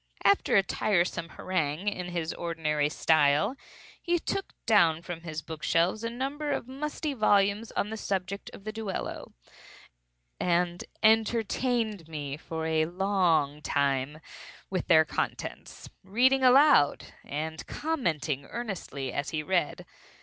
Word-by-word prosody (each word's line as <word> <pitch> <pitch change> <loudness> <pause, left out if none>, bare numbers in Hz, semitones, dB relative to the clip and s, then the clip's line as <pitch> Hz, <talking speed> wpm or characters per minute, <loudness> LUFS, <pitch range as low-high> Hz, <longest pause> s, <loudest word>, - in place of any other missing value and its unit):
After 400 - +4
a 195 - +6
tiresome 175 -4 0
harangue 170 0 -2
in 185 -3 -2
his 170 -2 -3
ordinary 155 -3 -1
style, 155 - +3 0.5
he 345 0 +1
took 390 +3 -3
down 170 -7 +4
from 170 -1 -6
his 155 -3 -6
book 160 -1 -8
shelves 175 +6 +1
a 230 - -1
number 275 +5 -3
of 245 - -2
musty 295 +2 -4
volumes 205 -2 +2
on 210 - -1
the 220 - -4
subject 195 -1 -3
of - - -12
the 215 - -4
duello, 215 -3 -5 1.1
and 175 0 +1 0.2
entertained 220 -2 +2
me 145 -3 -5
for 160 +1 -5
a 160 -1 +1
long 175 -6 +1
time 140 0 0 0.5
with 185 -2 -2
their 160 -3 +6
contents; - - -4 0.2
reading 250 +8 +3
aloud, 260 - +5
and 160 +2 -5
commenting 160 - -2
earnestly 185 - -5
as 140 - -2
he 155 -1 -2
read. 175 -2 0
180 Hz, 130 wpm, -28 LUFS, 155-220 Hz, 1.1 s, a